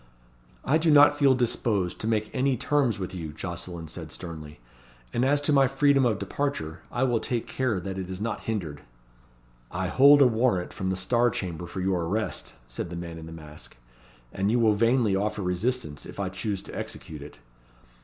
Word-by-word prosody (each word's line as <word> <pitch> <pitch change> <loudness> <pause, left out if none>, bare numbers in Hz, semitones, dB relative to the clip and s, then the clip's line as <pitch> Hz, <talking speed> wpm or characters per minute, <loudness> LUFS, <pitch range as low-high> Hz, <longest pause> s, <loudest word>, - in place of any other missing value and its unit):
"I 155 +4 +3
do 165 0 +2
not 145 0 +7
feel 135 -2 +5
disposed 110 -7 0
to 110 - -3
make 110 -1 0
any 130 -1 +1
terms 140 -3 +1
with 95 -2 -5
you," 80 -4 -5
Jocelyn 85 +1 -6
said - - -7
sternly; 80 -5 -8 0.5
"and 120 - +1
as 145 +2 +3
to 145 +1 +1
my 135 -1 +5
freedom 135 -1 +3
of 110 -4 0
departure, 100 - -3
I 120 - 0
will 120 -3 +2
take 120 -1 -2
care 125 -7 -1
that 95 +1 -5
it 95 -1 -5
is 95 0 -5
not 110 +1 -3
hindered." 85 -10 -3 0.9
"I 95 0 -2
hold 140 +7 +7
a - - +6
warrant 115 -6 +1
from 95 - -3
the 95 - -1
Star 120 +6 +2
Chamber 90 -5 -4
for 95 - -5
your 90 -2 0
arrest," 105 +6 -2
said - - -5
the 85 - -6
man 85 -1 -6
in 80 - -9
the - - -9
mask; 75 -4 -11 0.6
"and 95 +1 0
you 120 - +3
will 110 -2 +4
vainly 115 -1 +3
offer 105 +1 -1
resistance 90 - -2
if - - -10
I 100 -2 -1
choose 95 +1 -3
to - - -10
execute 75 -2 -6
it. 75 -3 -10
105 Hz, 195 wpm, -27 LUFS, 90-125 Hz, 0.9 s, not